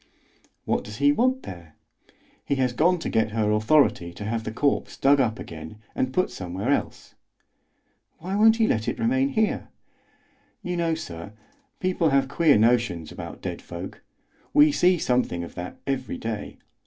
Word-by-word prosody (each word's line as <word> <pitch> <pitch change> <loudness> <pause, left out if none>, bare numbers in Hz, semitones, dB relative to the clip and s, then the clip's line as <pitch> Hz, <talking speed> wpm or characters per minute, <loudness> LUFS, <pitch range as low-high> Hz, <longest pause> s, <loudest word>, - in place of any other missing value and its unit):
"What - - 0
does 105 +1 -9
he 145 +1 +4
want 255 - +1
there?" 85 -4 -10 0.7
"He 140 - -1
has 130 -2 0
gone 175 +7 +3
to 165 - -5
get 110 -1 +1
her 110 -2 +1
authority 110 - +3
to 105 - -8
have 110 0 -2
the - - -3
corpse 140 +5 0
dug 140 +1 +4
up 115 -4 0
again 80 +4 -9 0.2
and 130 - -1
put 185 +7 0
somewhere 95 +7 -3
else." - - -2 1.0
"Why 185 +4 -4
won't 220 +2 +6
he 225 -1 +2
let 110 - 0
it - - -1
remain 260 +4 +1
here?" 220 -5 0 1.0
"You 180 0 -3
know, 165 -1 0
sir, 90 - -8 0.5
people 185 -3 +1
have 135 -1 +2
queer 155 -2 +4
notions 115 -8 +1
about - - -9
dead - - -4
folk. - - -8 0.5
We 150 +1 +7
see 180 +5 +3
something 125 - 0
of 85 - -9
that 90 0 -7
every 135 -2 -2
day. 110 -2 -5
130 Hz, 165 wpm, -25 LUFS, 105-170 Hz, 1.0 s, We